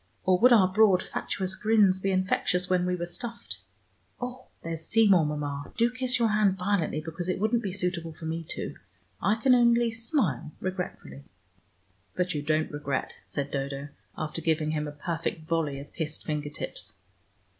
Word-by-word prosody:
Or 185 -1 +3
would 250 +2 +7
our 210 -6 +7
broad 190 -1 +4
fatuous 190 -1 -2
grins 210 -4 +4
be 195 - -1
infectious 185 -1 +1
when 180 -1 +2
we 180 - +1
were 175 -1 -3
stuffed? 200 - -6 0.6
Oh, 250 +1 -6 0.2
there's 165 -1 -4
Seymour, 195 -6 +4
Mama. 145 -1 -4
Do 235 0 +3
kiss 255 0 0
your 230 -2 +2
hand 210 -3 +3
violently, 180 -5 0
because 165 +3 -5
it 185 - 0
wouldn't 220 +3 +2
be 200 -4 -3
suitable 180 -3 -2
for 160 +1 -10
me 165 +1 -3
to. - - -4 0.5
I 210 +2 +3
can 250 +3 +4
only 235 -1 +4
smile 225 - -1
regretfully." 180 -6 -5 0.9
"But 180 0 0
you 150 - -2
don't 155 +1 0
regret," 145 -2 -3
said 140 -1 -3
Dodo, 140 +1 -3 0.3
after 155 +1 -3
giving 155 -1 +1
him 150 -1 -1
a - - -5
perfect 160 +1 -4
volley 160 -4 0
of 145 - -11
kissed 155 -2 -3
finger 150 -1 -2
tips. 105 -7 -7
180 Hz, 170 wpm, -28 LUFS, 155-210 Hz, 0.9 s, would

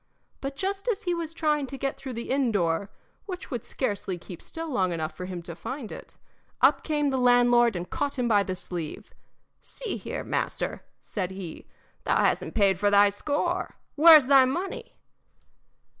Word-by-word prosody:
But 275 0 -4
just 390 - -3
as 445 -2 0
he 355 - 0
was 335 -2 -3
trying 300 -3 0
to 270 - -7
get 275 0 -2
through 270 -1 -7
the 235 +1 -5
inn 265 -3 +2
door 180 -1 0 0.4
which 365 -5 -7
would 240 -4 -3
scarcely 200 -7 -3
keep 175 0 -10
still 330 0 -7
long 215 - 0
enough 160 -2 -3
for 180 - -6
him 180 -2 -6
to 170 0 -6
find 260 - -6
it, - - -10 0.4
up - - +4
came 295 -2 0
the 265 - 0
landlord 245 -2 +5
and 175 0 -4
caught 285 +6 -2
him 245 -1 0
by 210 -3 +4
the 185 -2 -3
sleeve. 175 -4 -7 0.5
"See 480 -4 -5
here, - - -5
master," - - -2 0.2
said 185 -4 -3
he, 190 -4 -8 0.4
"thou - - +2
hasn't - - 0
paid 195 -4 +3
for 205 +1 +3
thy 205 0 +6
score 295 - -2 0.2
where's 310 -2 +8
thy 270 0 +7
money?" 350 +9 -4
250 Hz, 180 wpm, -27 LUFS, 195-295 Hz, 0.5 s, where's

